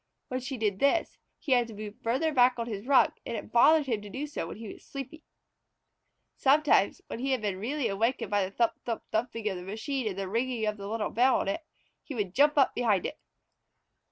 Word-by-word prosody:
When 255 Hz, -, -2 dB
she 255 Hz, +1 st, -5 dB
did 210 Hz, -4 st, -1 dB
this 280 Hz, +4 st, +1 dB, 0.2 s
he 300 Hz, -, -6 dB
had 245 Hz, -2 st, +4 dB
to 225 Hz, -, -10 dB
move 210 Hz, 0 st, -8 dB
farther 265 Hz, +8 st, +1 dB
back 250 Hz, -2 st, +5 dB
on 235 Hz, -, -2 dB
his 215 Hz, 0 st, -6 dB
rug, 275 Hz, -1 st, +5 dB
and 230 Hz, -, -4 dB
it -, -, -8 dB
bothered 295 Hz, +6 st, +6 dB
him 225 Hz, -6 st, -1 dB
to 205 Hz, -, -9 dB
do 270 Hz, +8 st, -4 dB
so 290 Hz, -, -5 dB
when 170 Hz, -, -8 dB
he 220 Hz, -2 st, -7 dB
was -, -, -17 dB
sleepy. 285 Hz, +3 st, -8 dB, 1.1 s
Sometimes, 275 Hz, -7 st, +3 dB
when -, -, -6 dB
he 265 Hz, +2 st, 0 dB
had 255 Hz, -, -1 dB
been 195 Hz, -3 st, -2 dB
really 265 Hz, +6 st, -1 dB
awakened 220 Hz, +2 st, -1 dB
by 205 Hz, -1 st, +3 dB
the 185 Hz, -, -3 dB
thump 230 Hz, +4 st, +1 dB
thump 230 Hz, -2 st, -3 dB
thumping 225 Hz, -1 st, -2 dB
of 190 Hz, -3 st, -1 dB
the -, -, -7 dB
machine 220 Hz, +7 st, -3 dB
and 195 Hz, -3 st, -3 dB
the 195 Hz, -1 st, -3 dB
ringing 230 Hz, +2 st, -1 dB
of 210 Hz, 0 st, -1 dB
the 200 Hz, 0 st, -7 dB
little 215 Hz, 0 st, -2 dB
bell 250 Hz, +4 st, +4 dB
on -, -, -4 dB
it, 200 Hz, +11 st, -1 dB, 0.4 s
he 285 Hz, -, -8 dB
would 200 Hz, -5 st, -2 dB
jump 295 Hz, +4 st, +4 dB
up 275 Hz, -, +4 dB
behind 215 Hz, -7 st, +1 dB
it. -, -, -5 dB
235 Hz, 230 wpm, -29 LUFS, 210-265 Hz, 1.1 s, bothered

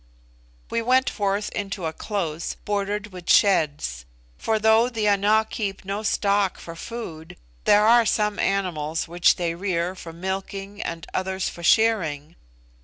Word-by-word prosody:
We 230 Hz, -, 0 dB
went 255 Hz, +2 st, +3 dB
forth 200 Hz, 0 st, -1 dB
into 200 Hz, -3 st, -4 dB
a 160 Hz, -, -2 dB
close, 170 Hz, -5 st, -3 dB
bordered 205 Hz, 0 st, -2 dB
with 180 Hz, -2 st, -9 dB
sheds; 145 Hz, -, +3 dB, 0.3 s
for 220 Hz, -, 0 dB
though 220 Hz, +2 st, +4 dB
the 220 Hz, -3 st, -1 dB
Ana 205 Hz, +2 st, +3 dB
keep 200 Hz, -5 st, -4 dB
no 200 Hz, +2 st, -3 dB
stock 200 Hz, -2 st, +1 dB
for 165 Hz, -, -9 dB
food, 165 Hz, -6 st, -8 dB, 0.3 s
there 210 Hz, +1 st, +5 dB
are 230 Hz, 0 st, +5 dB
some 210 Hz, -1 st, +1 dB
animals 165 Hz, -6 st, -1 dB
which 175 Hz, +1 st, +3 dB
they 170 Hz, -2 st, -1 dB
rear 175 Hz, -1 st, -1 dB
for 175 Hz, -3 st, -9 dB
milking 195 Hz, +3 st, -5 dB
and 165 Hz, -1 st, -5 dB
others 190 Hz, 0 st, -1 dB
for 170 Hz, -, -10 dB
shearing. 170 Hz, -7 st, +2 dB
195 Hz, 145 wpm, -24 LUFS, 170-210 Hz, 0.3 s, there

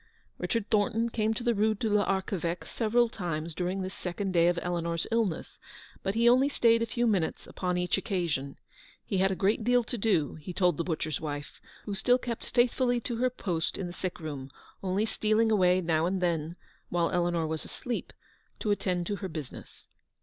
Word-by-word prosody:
Richard 230 Hz, -3 st, -1 dB
Thornton 220 Hz, +2 st, +2 dB
came 220 Hz, -1 st, +1 dB
to 240 Hz, -, -5 dB
the 240 Hz, -1 st, +3 dB
Rue 215 Hz, +1 st, +2 dB
de 220 Hz, -, -2 dB
l'Arche 200 Hz, -2 st, +1 dB
veque 170 Hz, 0 st, -3 dB
several 235 Hz, +1 st, +2 dB
times 170 Hz, -6 st, -4 dB
during 185 Hz, +3 st, -2 dB
this 185 Hz, +1 st, -5 dB
second 190 Hz, +2 st, -3 dB
day 170 Hz, -1 st, +5 dB
of 175 Hz, 0 st, +2 dB
Eleanor's 170 Hz, -1 st, -1 dB
illness, 225 Hz, -7 st, -1 dB, 0.4 s
but 195 Hz, -, -2 dB
he 235 Hz, +1 st, +4 dB
only 255 Hz, +4 st, +6 dB
stayed 230 Hz, -4 st, +4 dB
a 230 Hz, -, +1 dB
few 240 Hz, +1 st, 0 dB
minutes 195 Hz, -8 st, 0 dB
upon 180 Hz, -1 st, -2 dB
each 180 Hz, 0 st, +1 dB
occasion. 165 Hz, -9 st, -2 dB, 0.5 s
He 195 Hz, -, -1 dB
had 190 Hz, +1 st, +4 dB
a 190 Hz, -, -1 dB
great 205 Hz, +4 st, +1 dB
deal 245 Hz, +1 st, +4 dB
to 240 Hz, 0 st, -5 dB
do, 195 Hz, -9 st, +2 dB
he 180 Hz, -, -6 dB
told 180 Hz, -4 st, +2 dB
the 170 Hz, -, 0 dB
butcher's 155 Hz, -4 st, -2 dB
wife, 145 Hz, -2 st, -5 dB, 0.2 s
who 205 Hz, -, -3 dB
still 245 Hz, +6 st, +3 dB
kept 240 Hz, -2 st, -5 dB
faith 240 Hz, -1 st, +3 dB
fully 245 Hz, -2 st, +2 dB
to 235 Hz, 0 st, -3 dB
her 255 Hz, +2 st, +2 dB
post 180 Hz, -9 st, -2 dB
in 190 Hz, -, -3 dB
the 175 Hz, -, -6 dB
sick 185 Hz, 0 st, -4 dB
room, 145 Hz, -4 st, -6 dB, 0.3 s
only 195 Hz, +3 st, +1 dB
stealing 220 Hz, 0 st, +2 dB
away 185 Hz, -3 st, +4 dB
now 165 Hz, -1 st, +2 dB
and 190 Hz, +1 st, 0 dB
then, 170 Hz, -2 st, 0 dB, 0.3 s
while 170 Hz, -1 st, +1 dB
Eleanor 175 Hz, -2 st, +1 dB
was 160 Hz, 0 st, -3 dB
asleep, 245 Hz, -1 st, -5 dB, 0.5 s
to 210 Hz, -, -1 dB
attend 180 Hz, -3 st, 0 dB
to 205 Hz, +3 st, -2 dB
her 190 Hz, -2 st, -5 dB
business. 155 Hz, -5 st, -8 dB
190 Hz, 200 wpm, -29 LUFS, 170-225 Hz, 0.5 s, only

